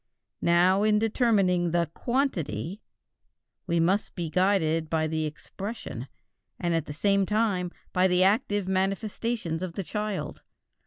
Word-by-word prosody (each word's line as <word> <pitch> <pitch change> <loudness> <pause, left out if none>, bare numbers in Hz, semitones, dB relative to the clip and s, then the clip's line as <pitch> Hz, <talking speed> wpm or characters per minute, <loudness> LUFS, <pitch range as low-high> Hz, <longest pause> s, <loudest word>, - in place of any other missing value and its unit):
Now 180 +3 +4
in 210 0 +4
determining 205 -6 +2
the 170 -1 0
"quantity" 200 - -2 0.9
we 170 -1 +1
must 185 +5 +1
be 170 -3 -3
guided 165 -4 +2
by 160 -1 +1
the 155 0 -1
expression 160 - -7 0.5
and 175 -1 0
at 165 -2 -1
the - - -5
same 195 +6 +2
time 210 -5 +1 0.2
by 185 +1 +4
the 180 0 +3
active 205 0 +2
manifestations 195 -1 -1
of 185 -2 -4
the 195 - -3
child. 210 +4 -4
185 Hz, 135 wpm, -27 LUFS, 165-205 Hz, 0.9 s, Now